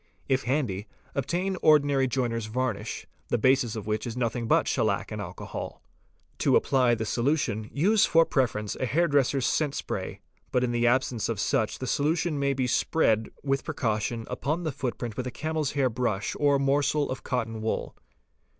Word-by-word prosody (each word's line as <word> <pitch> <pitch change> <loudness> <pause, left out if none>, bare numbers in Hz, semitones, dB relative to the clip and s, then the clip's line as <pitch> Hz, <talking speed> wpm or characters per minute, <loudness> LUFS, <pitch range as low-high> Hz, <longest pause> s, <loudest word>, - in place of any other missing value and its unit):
If 135 0 +1
handy, 120 -7 -1 0.3
obtain 180 +8 -1
ordinary 145 -3 +4
joiner's 115 -3 -1
varnish, 130 +3 -3 0.2
the - - +1
basis 130 -1 +2
of 110 -2 -5
which 110 +2 -2
is 120 +1 -5
nothing 115 -1 -1
but - - +3
shellac - - 0
and - - -4
alcohol. - - -7 0.6
To - - +3
apply 125 -3 +3
this 110 -1 -3
solution, 120 -5 0
use 200 +8 +3
for 165 0 +5
preference 115 -8 0
a 130 - -1
hairdresser's 140 -3 +2
scent 150 -3 +1
spray, - - -4 0.3
but 125 - +2
in 125 - 0
the 120 0 +2
absence 120 -2 +1
of 115 -3 -2
such 110 +1 0
the 130 - -5
solution 155 +3 0
may 140 0 +1
be 130 -1 0
spread 115 -4 +2
with 135 -1 0
precaution 115 0 -2
upon 155 +6 -2
the 155 - -1
footprint 125 -4 -4
with 125 - -2
a - - -1
camel's 155 +2 -2
hair 140 -3 +2
brush 115 -4 -1
or 145 -1 +4
morsel 140 +1 +1
of 130 - -4
cotton 115 -4 -2
wool. 110 - -2
130 Hz, 170 wpm, -27 LUFS, 115-145 Hz, 0.6 s, for